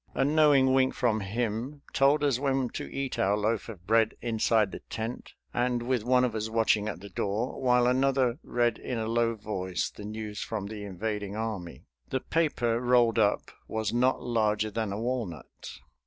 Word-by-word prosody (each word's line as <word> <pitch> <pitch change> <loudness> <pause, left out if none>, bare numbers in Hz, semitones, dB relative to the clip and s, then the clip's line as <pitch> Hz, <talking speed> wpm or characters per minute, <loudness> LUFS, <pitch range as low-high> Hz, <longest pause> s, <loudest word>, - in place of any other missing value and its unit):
A 135 - +2
knowing 145 -3 +5
wink 130 0 +3
from 115 -3 +1
him 115 +7 -3
told 140 +2 +4
us 135 -4 +2
when 135 -2 0
to - - -6
eat 135 -1 -3
our 100 +2 +2
loaf 110 +2 -1
of 95 -6 -10
bread 110 +1 +3
inside 110 -3 +1
the - - -7
tent 115 +2 -5 0.2
and 120 0 0
with 125 -2 0
one 125 +1 +3
of 125 -3 0
us 110 0 -2
watching 110 -2 +2
at 90 - -6
the 100 - -9
door 105 +8 -2
while 125 -1 +4
another 130 0 +2
read 120 -2 0
in 125 - -4
a 110 - -2
low 115 0 +1
voice 95 -4 -3
the - - -11
news 105 0 -5
from 110 -3 -3
the 105 0 -6
invading 105 +1 -4
army. 100 - -5 0.2
The 130 - 0
paper 125 -8 0
rolled 120 -2 +3
up 105 -1 +1 0.2
was 110 -1 -2
not 125 +2 +2
larger 110 -3 +1
than 110 -1 -2
a 100 - -3
walnut. 115 - -4
115 Hz, 185 wpm, -28 LUFS, 105-125 Hz, 0.2 s, knowing